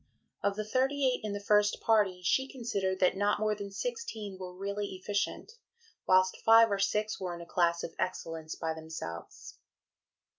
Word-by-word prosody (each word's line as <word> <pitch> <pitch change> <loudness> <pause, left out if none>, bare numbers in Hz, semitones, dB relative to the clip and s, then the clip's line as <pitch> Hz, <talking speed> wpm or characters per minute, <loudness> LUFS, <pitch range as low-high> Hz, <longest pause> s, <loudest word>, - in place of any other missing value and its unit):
Of 200 0 +1
the 215 0 -3
thirty 270 +4 +1
eight 255 - +1
in 210 -1 -3
the 205 - -3
first 210 0 +3
party, 200 -5 +2
she 265 +9 +1
considered 200 -7 -2
that 185 - +4
not 205 +2 +1
more 215 0 +1
than 200 -1 -6
sixteen 220 - -5
were 180 -1 -8
really 200 0 -3
efficient, 205 - -2 0.6
whilst 185 0 +4
five 225 0 +7
or 200 - 0
six 210 +2 0
were 180 -2 -3
in 170 - -9
a - - -8
class 170 -1 +1
of 165 - -5
excellence 165 -3 -3
by 160 -1 -2
themselves. 160 - -8
200 Hz, 175 wpm, -31 LUFS, 180-215 Hz, 0.6 s, five